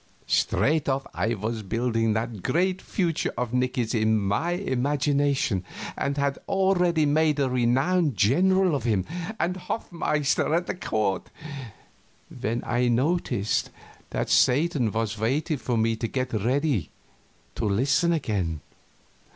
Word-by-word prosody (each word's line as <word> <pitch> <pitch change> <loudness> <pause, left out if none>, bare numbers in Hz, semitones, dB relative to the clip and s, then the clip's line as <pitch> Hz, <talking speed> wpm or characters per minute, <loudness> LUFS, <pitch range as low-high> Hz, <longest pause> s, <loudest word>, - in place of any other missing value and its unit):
Straight 155 0 +1
off 135 0 0
I 115 +2 0
was 110 +2 -3
building 115 +1 0
that 110 -2 -3
great 180 - 0
future 170 -5 -1
of 125 -1 -2
Nicky's 125 -2 0
in 110 -1 +2
my 105 - 0
imagination, 140 - 0 0.3
and 140 +1 -2
had 140 -1 0
already 180 -4 +2
made 150 +1 +2
a 140 - +2
renowned 130 - +1
general 185 - +3
of 140 - -1
him 105 -6 +1 0.3
and 180 +2 0
hofmeister 160 -6 -1
at 175 - -2
the - - -2
court, 105 - -2 1.1
when 115 +3 -2
I 120 +1 +1
noticed 125 - 0 0.4
that - - -2
Satan 135 -3 +3
was 110 0 -2
waiting 145 +8 0
for 125 -2 -2
me 115 0 +2
to 115 - -2
get 130 +1 -3
ready 125 - 0 0.6
to - - -3
listen 135 - +2
again. 100 - -1
130 Hz, 130 wpm, -26 LUFS, 110-155 Hz, 1.1 s, general